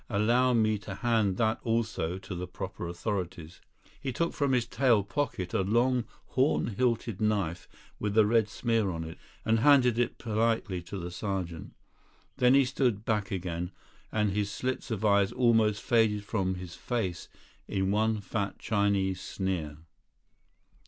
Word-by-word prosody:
Allow 120 Hz, +4 st, +3 dB
me 110 Hz, -2 st, +2 dB
to 95 Hz, 0 st, -7 dB
hand 110 Hz, -5 st, +1 dB
that 110 Hz, -1 st, +1 dB
also 110 Hz, -7 st, -1 dB
to 95 Hz, 0 st, -8 dB
the 90 Hz, 0 st, -4 dB
proper 90 Hz, -1 st, -6 dB
authorities." 90 Hz, -2 st, -4 dB, 0.4 s
He 135 Hz, -, -2 dB
took 170 Hz, +7 st, -1 dB
from 140 Hz, -3 st, 0 dB
his 125 Hz, -3 st, +2 dB
tail 120 Hz, -3 st, +3 dB
pocket 100 Hz, -6 st, -3 dB
a -, -, +2 dB
long 120 Hz, +5 st, +2 dB, 0.2 s
horn 130 Hz, -2 st, +2 dB
hilted 115 Hz, -3 st, 0 dB
knife 100 Hz, -5 st, 0 dB, 0.3 s
with 105 Hz, 0 st, -2 dB
a 110 Hz, -, +7 dB
red 110 Hz, 0 st, +3 dB
smear 115 Hz, -3 st, 0 dB
on 80 Hz, -2 st, -3 dB
it, 80 Hz, 0 st, -9 dB, 0.3 s
and 110 Hz, 0 st, +3 dB
handed 125 Hz, -3 st, +5 dB
it 120 Hz, -, 0 dB
politely 110 Hz, -4 st, 0 dB
to 90 Hz, +3 st, -7 dB
the 90 Hz, -1 st, -5 dB
sergeant. 90 Hz, -4 st, -4 dB, 0.6 s
Then 125 Hz, 0 st, +5 dB
he 140 Hz, -1 st, +5 dB
stood 125 Hz, -5 st, 0 dB
back 105 Hz, -3 st, 0 dB
again, 90 Hz, -2 st, -3 dB, 0.4 s
and 105 Hz, -2 st, +1 dB
his 105 Hz, +1 st, -1 dB
slits 130 Hz, +4 st, -3 dB
of 110 Hz, -2 st, -2 dB
eyes 100 Hz, -2 st, +4 dB
almost 115 Hz, -4 st, +3 dB
faded 110 Hz, -3 st, +2 dB
from 95 Hz, -3 st, -1 dB
his 90 Hz, -1 st, -8 dB
face 95 Hz, -8 st, -3 dB, 0.4 s
in 95 Hz, 0 st, 0 dB
one 110 Hz, +1 st, +1 dB
fat 100 Hz, 0 st, -3 dB
Chinese 100 Hz, -3 st, 0 dB
sneer. 85 Hz, -7 st, -3 dB
105 Hz, 155 wpm, -29 LUFS, 95-115 Hz, 0.6 s, a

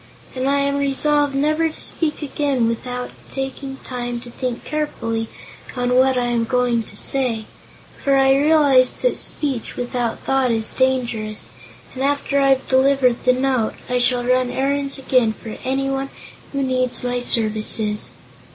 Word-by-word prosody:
And 260 Hz, +1 st, 0 dB
I 280 Hz, -, +2 dB
am 280 Hz, 0 st, 0 dB
resolved 285 Hz, +1 st, +1 dB
never 310 Hz, +3 st, +2 dB
to 310 Hz, -, -10 dB
speak 305 Hz, -2 st, 0 dB
again 275 Hz, -4 st, 0 dB
without 245 Hz, +2 st, -4 dB, 0.2 s
taking 270 Hz, 0 st, -5 dB
time 245 Hz, -1 st, -4 dB
to 240 Hz, -, -11 dB
think 250 Hz, -1 st, -4 dB
carefully 230 Hz, -7 st, -2 dB, 0.5 s
on 245 Hz, 0 st, 0 dB
what 260 Hz, +1 st, +4 dB
I 245 Hz, -, +1 dB
am 240 Hz, -1 st, +1 dB
going 245 Hz, -1 st, +1 dB
to 205 Hz, -2 st, -9 dB
say, 240 Hz, -5 st, -1 dB, 0.6 s
for 275 Hz, -1 st, +3 dB
I 270 Hz, 0 st, +5 dB
realize 280 Hz, -3 st, +5 dB
that -, -, 0 dB
speech 270 Hz, -6 st, -1 dB
without 245 Hz, -1 st, -2 dB
thought 270 Hz, -1 st, +1 dB
is 225 Hz, -1 st, 0 dB
dangerous. 240 Hz, -5 st, -1 dB, 0.4 s
And 260 Hz, -, -6 dB
after 280 Hz, 0 st, +1 dB
I've 270 Hz, -1 st, +3 dB
delivered 260 Hz, -2 st, +3 dB
the 255 Hz, -, +5 dB
note, 255 Hz, -3 st, 0 dB, 0.2 s
I 250 Hz, -, +2 dB
shall 245 Hz, 0 st, +2 dB
run 255 Hz, 0 st, +2 dB
errands 275 Hz, +2 st, -1 dB
again 255 Hz, -4 st, +2 dB
for 220 Hz, 0 st, -9 dB
anyone 270 Hz, +1 st, -1 dB, 0.4 s
who 275 Hz, -1 st, -1 dB
needs 255 Hz, -2 st, -1 dB
my 245 Hz, 0 st, -1 dB
services." 215 Hz, -2 st, +1 dB
260 Hz, 150 wpm, -20 LUFS, 245-275 Hz, 0.6 s, I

